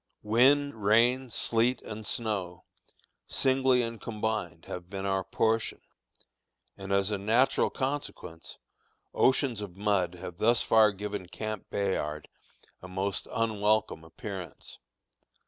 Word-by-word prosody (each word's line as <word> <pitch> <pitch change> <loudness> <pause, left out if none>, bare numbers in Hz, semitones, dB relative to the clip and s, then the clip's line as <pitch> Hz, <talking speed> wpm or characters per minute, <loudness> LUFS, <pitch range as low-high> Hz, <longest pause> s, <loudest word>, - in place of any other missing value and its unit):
Wind, 130 +2 +3
rain, 120 +5 +4
sleet, 115 +2 +1
and 110 0 -7
snow, 100 -6 -2 0.6
singly 130 -1 +3
and 115 -1 -5
combined, 105 -7 -3
have 90 0 -7
been 100 0 -5
our 95 -1 0
portion, 110 +4 0 1.0
and 95 0 -7
as 100 +1 +2
a 105 - -1
natural 115 +6 +3
consequence, 130 - -4 0.6
oceans 130 -4 +2
of 95 -3 -8
mud 100 -4 +1
have 90 -1 -8
thus 120 +4 +3
far 110 -2 +5
given 100 -1 -5
Camp 110 +2 -6
Bayard 75 -7 -2 0.5
a 90 - -9
most 95 +1 -2
unwelcome 110 -5 +1
appearance. 90 0 -8
105 Hz, 115 wpm, -29 LUFS, 95-115 Hz, 1.0 s, far